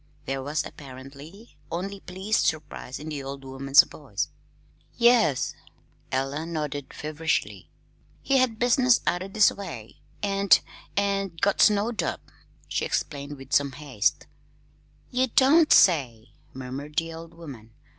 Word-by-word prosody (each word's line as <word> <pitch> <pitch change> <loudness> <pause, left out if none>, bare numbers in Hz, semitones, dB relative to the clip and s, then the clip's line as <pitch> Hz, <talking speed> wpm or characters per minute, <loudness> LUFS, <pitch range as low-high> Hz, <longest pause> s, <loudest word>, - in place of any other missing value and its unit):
There 135 0 -3
was 145 +3 -2
apparently 140 - -12
only 195 +4 -4
pleased 190 -3 -1
surprise 155 -5 -4
in 155 +1 -7
the 150 -2 -4
old 135 0 -7
woman's 135 +1 +5
voice. - - -5 0.7
"Yes," 235 - +3 0.6
nodded 145 +1 -3
Ella - - -13
feverishly, 155 +2 -2 0.5
"he 275 -1 +3
had 250 -4 +1
business 245 +1 +4
out 185 +2 -1
this 210 -2 +6
way, 120 - -8 0.3
and 200 0 +4 0.4
and 195 -4 0
got 200 -1 +2
snowed 215 +2 +3
up," - - -5 0.4
she - - -2
explained 145 0 -3
with 135 +1 -10
some 140 -2 +3
haste. 135 -8 -1 0.9
"Ye 255 +1 +2
don't 290 +7 +4
say," 125 - +4 0.2
murmured 130 +3 -7
the 165 0 -1
old 165 0 -10
woman. 135 -10 -11
155 Hz, 125 wpm, -26 LUFS, 135-200 Hz, 0.9 s, this